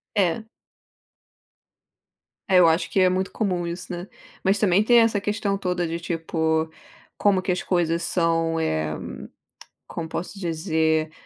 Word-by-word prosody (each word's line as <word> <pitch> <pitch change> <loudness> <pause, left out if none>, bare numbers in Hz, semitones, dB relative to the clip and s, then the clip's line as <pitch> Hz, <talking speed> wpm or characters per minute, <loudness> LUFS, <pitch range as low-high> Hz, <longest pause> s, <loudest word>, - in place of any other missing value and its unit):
É. 200 +2 +1 2.0
É, 185 -2 +5
eu 175 - +7
acho 165 +2 +2
que 195 - +1
é 185 -1 +5
muito 185 +1 -1
comum 185 -5 -1
isso, 175 +2 -6
né. 175 +1 -5 0.4
Mas 195 +1 +2
também 200 -1 +4
tem 240 +2 +6
essa 225 -3 +3
questão 205 -1 -1
toda 180 -3 -1
de 165 +1 -3
tipo, 160 -1 -1 0.5
como 200 -2 +3
que 185 - -1
as 180 - -1
coisas 170 -2 0
são, 165 -2 +1
eh, 80 - -1 0.9
como 165 -1 -5
posso 180 +5 -5
dizer? 160 -2 0
175 Hz, 145 wpm, -24 LUFS, 165-195 Hz, 2.0 s, eu